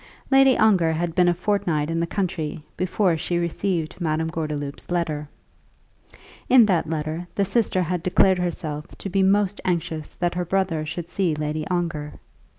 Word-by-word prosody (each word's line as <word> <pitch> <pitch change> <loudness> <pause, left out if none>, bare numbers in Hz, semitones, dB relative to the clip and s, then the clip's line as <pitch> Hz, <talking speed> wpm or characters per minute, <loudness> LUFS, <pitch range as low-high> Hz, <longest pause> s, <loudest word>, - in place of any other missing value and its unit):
Lady 270 -1 +6
Ongar 185 -7 +4
had 165 +1 -2
been 180 0 +3
a 175 - +4
fortnight 175 -5 0
in 165 - -1
the 170 - 0
country 165 -6 -3
before 185 0 +1
she 175 +2 -2
received 170 0 -2
Madame 160 0 0
Gordeloup's 150 -3 -4
letter. 155 -4 -2 1.2
In 250 -3 +8
that 175 -6 +1
letter 160 +2 -3
the 200 - +2
sister 195 -2 +1
had 175 0 -2
declared 185 +1 +3
herself 160 -3 -3
to 195 - -6
be 195 +1 +2
most 200 +1 +2
anxious 165 -4 -2
that 175 -1 -1
her 180 0 -1
brother 175 -4 -1
should 165 +2 -5
see 175 -2 0
Lady 150 +1 -3
Ongar. 165 -5 -2
175 Hz, 160 wpm, -23 LUFS, 155-185 Hz, 1.2 s, In